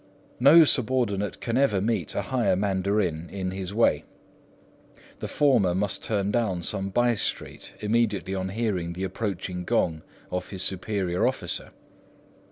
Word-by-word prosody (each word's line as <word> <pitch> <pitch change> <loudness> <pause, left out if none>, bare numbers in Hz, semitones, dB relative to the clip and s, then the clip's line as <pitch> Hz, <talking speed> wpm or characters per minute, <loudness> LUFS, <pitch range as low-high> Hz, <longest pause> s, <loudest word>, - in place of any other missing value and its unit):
No 145 +6 +8
subordinate 120 -8 +1
can 115 0 -1
ever 135 -8 +3
meet 105 -4 -1
a - - -1
higher 125 -7 +1
mandarin 95 -3 0
in 95 -2 -3
this 95 0 -5
way; 115 +3 +2 1.2
the - - -4
former 115 -12 +3
must 100 +1 -1
turn 100 -2 0
down 105 -6 0
some 95 +3 -1
by 120 +4 +2
street 110 - -4
immediately 105 -4 0
on 95 0 -2
hearing 95 -5 -2
the 90 +2 -5
approaching 95 -2 -3
gong 85 -7 0 0.3
of 90 - -3
his 95 -2 -4
superior 95 -2 -1
officer. - - -3
100 Hz, 140 wpm, -26 LUFS, 95-115 Hz, 1.2 s, No